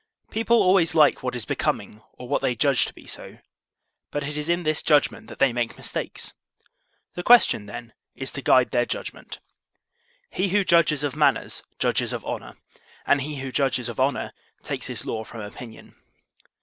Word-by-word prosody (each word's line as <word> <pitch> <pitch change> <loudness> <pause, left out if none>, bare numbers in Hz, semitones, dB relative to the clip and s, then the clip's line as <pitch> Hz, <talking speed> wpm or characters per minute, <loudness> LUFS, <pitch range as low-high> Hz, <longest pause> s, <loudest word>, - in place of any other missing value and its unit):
People 225 +1 +2
always 180 -3 +4
like 155 -2 +5
what 125 -1 -3
is 120 -4 -4
becoming 105 +2 -2
or 125 - -10
what - - 0
they 125 - 0
judge 135 +2 +3
to - - -8
be - - -15
so; - - -8 0.7
but 145 - -3
it 145 +1 -4
is 150 +2 -3
in 175 +1 +1
this 155 -1 +1
judgment 145 -2 +2
that - - -10
they 135 -3 +3
make 120 -1 -2
mistakes; - - -5 0.8
the 175 - -4
question, 205 - +5
then, 115 +2 -8 0.2
is 130 - -4
to 140 - -6
guide 130 -1 +4
their 120 - +3
judgment. - - -6 0.9
He 190 +1 0
who 205 +2 +3
judges 165 -5 +3
of 145 -2 -2
manners 145 -3 +1 0.2
judges - - +1
of - - -5
honor; - - -6 0.5
and 140 - +3
he 150 +2 -4
who 135 -1 -5
judges 130 -3 0
of 120 - -7
honor 135 +2 0 0.3
takes - - -4
his - - -3
law 110 -1 -3
from 115 0 -9
opinion. 110 +2 -10
140 Hz, 180 wpm, -24 LUFS, 125-155 Hz, 0.9 s, like